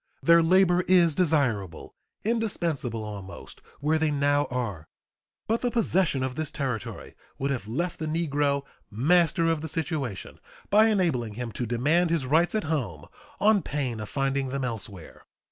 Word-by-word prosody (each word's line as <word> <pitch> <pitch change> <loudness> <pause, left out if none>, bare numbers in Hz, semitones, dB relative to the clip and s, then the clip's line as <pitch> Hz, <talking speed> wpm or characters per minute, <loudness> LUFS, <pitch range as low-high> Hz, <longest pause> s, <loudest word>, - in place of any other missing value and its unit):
Their 170 0 +6
labor 180 +1 +4
is 175 -3 +5
desirable 135 - 0 0.3
indispensable 170 - -1
almost 100 -3 -9 0.2
where 155 +2 +2
they 160 -1 +2
now 145 0 +2
are. 115 - -4 0.6
But 225 +2 0
the 245 - +1
possession 190 - +1
of 130 -1 -2
this 155 +2 -3
territory 125 -7 -4 0.2
would 140 +1 -1
have 120 -7 -3
left 170 +10 -3
the 155 - -3
negro 145 -3 0 0.3
"master 165 - +2
of 165 -2 +1
the 160 - -4
situation," 145 - -4 0.3
by 215 +2 +6
enabling 160 - 0
him 120 0 -5
to 120 +2 -4
demand 150 +10 +2
his 165 -5 0
rights 160 +9 +2
at 215 - 0
home 120 - -3 0.3
on 210 -1 +4
pain 135 -7 -3
of 105 -2 -6
finding 135 0 -1
them 135 0 -3
elsewhere. 105 -7 -7
145 Hz, 155 wpm, -26 LUFS, 125-170 Hz, 0.6 s, Their